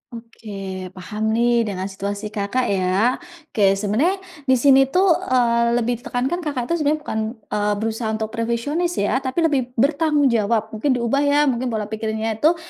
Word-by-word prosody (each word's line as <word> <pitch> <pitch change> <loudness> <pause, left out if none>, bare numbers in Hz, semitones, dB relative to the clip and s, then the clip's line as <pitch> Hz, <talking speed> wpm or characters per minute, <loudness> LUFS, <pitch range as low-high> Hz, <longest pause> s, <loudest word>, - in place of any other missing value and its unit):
Oke, 230 -1 -13 0.5
paham 210 +4 -2
nih 235 -1 +2
dengan 190 -2 -3
situasi 200 +2 -5
Kakak 215 +4 -1
ya. 195 +6 +1 0.3
Oke, 195 -2 +3
sebenarnya 215 - +1 0.3
di 260 - +5
sini 270 +1 +5
itu, 365 +7 +2
eee, 235 -9 +2
lebih 240 0 0
ditekankan 265 +6 -2
Kakak 290 -7 -3
itu - - +3
sebenarnya 300 +1 +1
bukan, 220 - -3 0.3
eee, 210 0 +1
berusaha 220 +2 -2
untuk 220 0 -4
perfeksionis 240 +10 -1
ya, 210 +5 +1
tapi 270 +5 -1
lebih 290 -5 +2
bertanggung 290 +1 +2
jawab, 220 0 0
mungkin 255 +5 0
diubah 240 +3 0
ya, 290 +1 +3
mungkin 250 +1 -2
pola 220 -3 -3
pikirnya 220 0 -3
itu, 315 +6 +4
235 Hz, 165 wpm, -21 LUFS, 215-275 Hz, 0.5 s, di